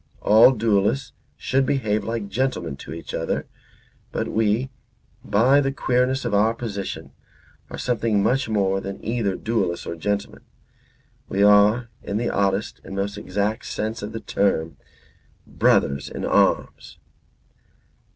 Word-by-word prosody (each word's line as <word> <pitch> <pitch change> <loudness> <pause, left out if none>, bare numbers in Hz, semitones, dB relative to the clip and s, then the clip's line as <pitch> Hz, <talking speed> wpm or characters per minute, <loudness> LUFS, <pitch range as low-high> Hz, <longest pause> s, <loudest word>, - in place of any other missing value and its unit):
All 110 +4 +7
duellists 110 +1 0 0.2
should 135 +1 +1
behave 130 -7 0
like 115 -2 -3
gentlemen 100 - -2
to - - -10
each 80 +1 -8
other. - - -2 0.7
But - - -2
we, 110 +4 0 0.5
by 130 +7 +4
the 135 -1 0
queerness 130 0 0
of - - -2
our 110 +3 +3
position, 105 -5 -5 0.6
are - - -7
something 115 -4 0
much 130 0 +1
more 95 -2 +1
than 100 0 -7
either 110 -4 -1
duellists 110 -6 -2
or - - -4
gentlemen. 100 +4 -3 0.9
We 100 +1 +1
are, 105 +3 +5
in 100 - -3
the 120 +2 -1
oddest 100 +1 -1
and 95 - -8
most 100 +1 -2
exact 105 +3 -2
sense 110 +1 -3
of 105 +1 -5
the 115 - -6
term, 80 -5 0 0.7
brothers 70 0 +1
in - - -5
arms." - - +1
105 Hz, 135 wpm, -23 LUFS, 100-120 Hz, 0.9 s, All